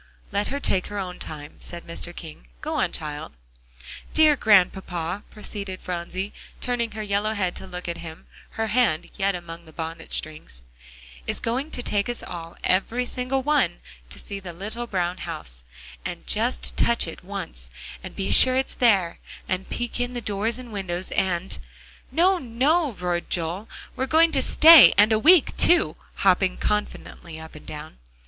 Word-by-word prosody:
"Let 200 +1 0
her 280 - -3
take 190 -9 0
her 205 - -6
own 185 -2 -4
time," 150 -1 -8
said 175 -1 -7
Mr. 170 +1 -2
King, 155 - -10
"go - - -4
on, - - +1
child." 150 -1 -5 0.8
"Dear 310 -2 +6
Grandpapa," 190 - +2
proceeded 200 -3 -6
Phronsie, 180 +3 -4 0.3
turning 240 -2 -1
her 215 0 -4
yellow 205 +1 0
head 185 -3 -1
to 190 - -6
look 180 -1 -7
at 170 - -4
him, 160 -1 -9 0.3
her 225 - +1
hand 215 -8 +1
yet 195 -1 +1
among 170 -1 -8
the 160 - -14
bonnet 165 +1 -6
strings, 155 - -2 0.6
"is - - -2
going 255 +6 -2
to 245 - -5
take 205 0 0
us 240 - -3
all, 165 -1 -7
every 225 +7 +1
single 255 +2 -2
one, 275 - +2 0.3
to - - -7
see 200 -1 -7
the 180 -3 -8
little 215 +7 -4
brown 180 -3 -1
house, - - -7 0.4
and - - -6
just - - -1
touch - - +3
it - - -9
once, - - -7 0.3
and - - -8
be 195 - -2
sure 255 0 +6
it's 265 - -1
there, 195 -8 +2 0.3
and 185 0 -2
peek 240 0 -3
in 245 0 -2
the - - -1
doors 215 +1 -1
and 245 -3 -9
windows 185 -2 -4
and" 185 0 -1 0.5
"No, 365 +2 +3
no," 275 +4 +1
roared 180 -2 -2
Joel, 175 +5 -1 0.3
"we're 260 - -1
going 325 +3 +5
to 275 -4 +2
stay, 320 0 +9
and 210 +2 +6
a 215 - +4
week 320 +4 +5
too," 350 0 +5 0.2
hopping 185 0 +2
confidently 190 -5 -3
up 160 0 -11
and 155 - -13
down. 150 - -8
195 Hz, 170 wpm, -24 LUFS, 170-240 Hz, 0.8 s, stay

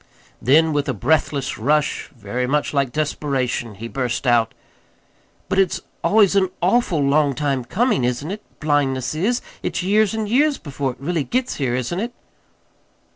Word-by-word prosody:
Then, 155 +6 +4
with 145 -1 0
a 130 - -1
breathless 140 +2 0
rush, 150 +5 +1
very 120 +4 -3
much 150 +3 0
like 140 -3 +1
desperation, 135 -6 -2
he 115 +4 -7
burst 125 +1 -2
out: 120 -3 +3 0.9
"But 190 - +1
it's 190 -3 +2 0.2
always 205 -2 +4
an 190 -2 +3
awful 190 -3 +2
long 140 0 +3
time 140 -3 -1
comin', 215 - +1
isn't 125 +7 -1
it? 210 +2 -5 0.2
Blindness 140 -4 0
is. 210 +11 0 0.2
It's - - -2
years 210 +3 +2
and 220 -1 -2
years 280 +6 +3
before 140 -3 -3
it - - -22
really 160 +2 -1
gets 255 - -1
here, 130 -4 0
isn't 130 +8 -2
it?" 235 +3 -3
145 Hz, 160 wpm, -21 LUFS, 130-190 Hz, 0.9 s, Then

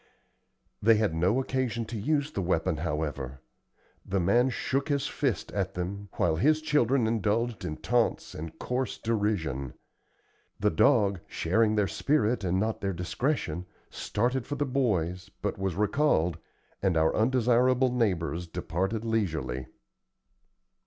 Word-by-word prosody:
They 115 +2 +6
had 105 -5 +1
no 90 +9 +2
occasion 130 -3 -1
to 115 - -7
use 145 +6 0
the 100 - -2
weapon, 85 -3 0
however. 75 -5 -3 0.6
The 100 0 -1
man 120 +9 +3
shook 135 +3 -1
his 140 -1 +1
fist 135 -7 -1
at 95 -1 -2
them, 100 +3 -4
while 80 -2 +1
his 155 - +3
children 140 -5 +2
indulged 110 +1 0
in 75 - -4
taunts 120 -2 0
and 80 +1 -7
coarse 125 -1 -2
derision. 100 - -1 0.8
The 105 +1 +2
dog, 100 - +3
sharing 110 +5 +1
their 105 -1 +3
spirit 120 -5 +1
and 95 0 +1
not 110 +2 -1
their 100 -1 -1
discretion, 90 - -2 0.2
started 120 +3 -1
for 145 - -3
the 145 +1 0
boys, 95 - 0
but - - -3
was 95 -3 -1
recalled, 100 - +2 0.4
and 95 -4 +2
our 80 0 +3
undesirable 125 +2 +3
neighbors 90 - 0
departed 95 +7 -2
leisurely. 80 - -1
105 Hz, 135 wpm, -28 LUFS, 85-125 Hz, 0.8 s, They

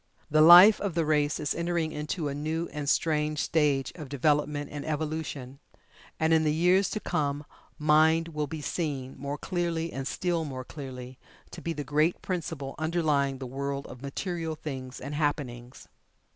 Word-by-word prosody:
The 155 +1 +5
life 175 +6 +9
of 200 -5 -2
the 165 -2 +1
race 150 -1 +1
is 150 - -1
entering 170 -2 -1
into 150 +2 -3
a 140 - -3
new 155 +4 -2
and 145 -2 -3
strange 150 -1 +1
stage 145 -5 +1
of 150 -6 -9
development 145 +1 0
and 145 -1 -5
evolution, 150 -4 -4 0.6
and 160 +1 +3
in 160 -1 +4
the 155 - +2
years 180 +5 +3
to 215 - -3
come 145 -5 -2 0.3
MIND 160 +2 +4
will 150 -2 -3
be 155 +1 -6
seen, 140 -5 -3
more 140 +2 -5
clearly 170 -1 -2
and 135 0 -4
still 175 0 -1
more 130 -4 -5
clearly, 130 -3 -8 0.3
to - - -9
be 165 - -2
the 150 - -4
great 150 +5 +1
principle 160 -7 -4
underlying 155 -4 +1
the 130 - -6
world 140 +2 -4
of 125 - -11
material 165 +3 -3
things 130 -4 -7
and 140 +2 -6
happenings. 130 -5 -3
150 Hz, 170 wpm, -28 LUFS, 140-165 Hz, 0.6 s, life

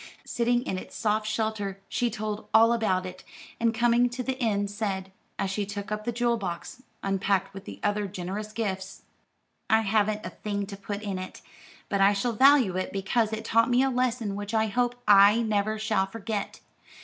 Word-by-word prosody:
Sitting 240 +1 +1
in 185 - -3
its - - -11
soft 215 -1 0
shelter, 215 -3 -2
she 245 - 0
told 215 -1 -4
all 230 +1 +7
about 190 -6 0
it, 185 0 -8 0.4
and 230 0 +3
coming 240 +1 +3
to 250 +1 -4
the 265 +1 -2
end 205 -3 0
said, 195 -2 -3 0.3
as 190 - -1
she 205 +2 -1
took 200 +1 -6
up 210 0 -3
the 240 - 0
jewel 240 0 +1
box, 190 +5 -6 0.2
unpacked 195 0 0
with 195 0 -9
the - - -9
other 205 0 0
generous 195 +3 -5
gifts: 195 -4 -4 0.7
"I 220 0 +5
haven't 210 0 +1
a - - -5
thing 205 -1 -3
to 200 0 -8
put 200 +1 -6
in 195 -3 -3
it, 185 - -8 0.5
but 200 -1 0
I 200 +1 +6
shall 230 +4 -1
value 260 -5 +5
it 185 - -2
because 210 +3 0
it 220 0 -4
taught 230 +2 +3
me 245 +2 +4
a 270 - +1
lesson 245 -5 -1
which 205 +2 -4
I 220 0 +3
hope 245 +3 0
I 205 +3 +7
never 215 0 0
shall 215 -3 0
forget. 215 0 -5
210 Hz, 195 wpm, -27 LUFS, 195-230 Hz, 0.7 s, all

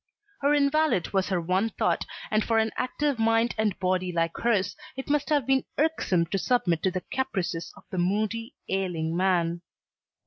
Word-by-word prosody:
Her 285 +1 +4
invalid 290 - +2
was 195 -1 +1
her 185 -2 +1
one 185 +6 +1
thought, - - 0 0.3
and 215 0 +3
for 225 - +1
an 220 0 +2
active 275 +1 -1
mind 225 +1 +3
and 215 -3 0
body 185 -1 0
like 165 -1 0
hers, 205 -5 +1 0.2
it 265 +2 -4
must 295 +1 +1
have 290 -5 +2
been 265 0 +2
irksome 285 - +2
to 195 - +1
submit 175 -9 +1
to 190 - +2
the 185 0 -3
caprices 195 -10 -2
of - - -15
a 185 - -2
moody, 215 - -1
ailing 175 -4 -1
man. 175 -2 +1
205 Hz, 175 wpm, -27 LUFS, 180-255 Hz, 0.3 s, Her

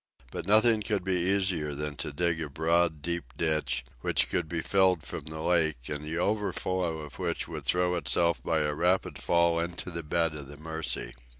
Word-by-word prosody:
But - - -5
nothing 110 +1 +5
could 105 -3 -1
be 90 -1 +1
easier 90 -7 +1
than 75 +1 -3
to 70 - -4
dig 85 +2 +1
a 75 - -3
broad 80 +1 +1
deep 85 -8 -3
ditch, 75 -6 0
which - - +1
could 80 - -1
be 85 -2 -2
filled 95 -5 +3
from - - -6
the 80 0 -5
lake, 80 -7 +1
and 75 0 -3
the 80 +2 -2
overflow 95 -3 0
of 75 -1 -9
which 85 -3 -2
would - - -7
throw 90 0 +2
itself 85 -1 +1
by 80 -2 +1
a 75 0 0
rapid 90 +5 +1
fall 85 -1 +2
into 85 +1 -4
the 85 0 -4
bed 80 +1 0
of 75 -2 -7
the 70 +1 -11
Mercy. 80 +1 -4
85 Hz, 195 wpm, -29 LUFS, 75-90 Hz, -, nothing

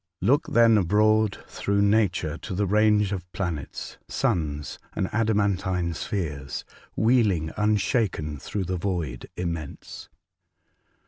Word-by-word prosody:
Look 140 - +2
then 115 -2 +5
abroad 105 +2 +3
through 100 0 0
nature 100 -7 +2
to 95 - -5
the 100 +2 +1
range 105 0 +3
of 90 -3 -5
planets, 85 -8 -4
suns, 75 -3 -1 0.2
and - - 0
adamantine 100 -5 +1
spheres, 75 -6 -4 0.3
wheeling 105 -9 +2
unshaken 105 - 0
through 95 +9 -3
the 90 +1 -2
void 85 -9 -3
immense. 85 -5 -5
95 Hz, 110 wpm, -26 LUFS, 85-105 Hz, 0.3 s, then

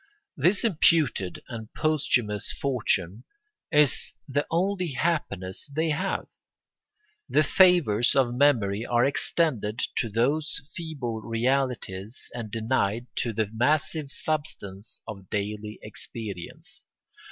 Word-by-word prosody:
This 195 +3 +2
imputed 155 - +2
and 115 -3 -7
posthumous 125 -9 +1
fortune 110 -6 0 0.5
is 150 -3 +4
the 145 +1 0
only 180 -1 0
happiness 100 - -1
they 160 +2 0
have. 185 +5 -1 1.0
The 155 - +4
favours 155 - +4
of 130 -3 +3
memory 115 -6 +3
are 120 0 +2
extended 135 -6 0 0.2
to 115 - 0
those 140 +8 +1 0.2
feeble 135 -9 -4
realities 115 -3 -1
and 115 -3 -5
denied 115 0 0
to 120 - 0
the 110 -1 -1
massive 150 +5 +1
substance 115 -11 -4
of 95 -4 -8
daily 105 +1 -3
experience. 105 -3 -7
120 Hz, 105 wpm, -27 LUFS, 105-155 Hz, 1.0 s, is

